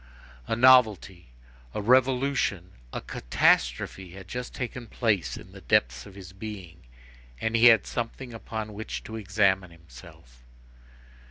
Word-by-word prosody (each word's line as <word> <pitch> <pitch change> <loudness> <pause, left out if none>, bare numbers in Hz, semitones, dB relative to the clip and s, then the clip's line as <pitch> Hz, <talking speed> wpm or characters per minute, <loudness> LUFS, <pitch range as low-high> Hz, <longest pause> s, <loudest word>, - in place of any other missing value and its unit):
A - - 0
novelty, 110 -8 +4 0.5
a - - -1
revolution, 125 -6 +2 0.2
a - - -5
catastrophe 60 +8 0
had 95 -1 -11
just 125 +3 -6
taken 125 -1 -6
place 105 - -1
in - - -13
the - - -13
depths - - +1
of 95 - -14
his 95 -2 -11
being; 95 -4 -9 0.6
and 110 +8 -1
he 115 +1 +4
had 115 -4 +6
something 120 +1 -5
upon 110 -1 -6
which 110 +2 -6
to 110 - -8
examine 95 -3 +1
himself. 60 -6 -16
105 Hz, 135 wpm, -26 LUFS, 90-115 Hz, 0.6 s, had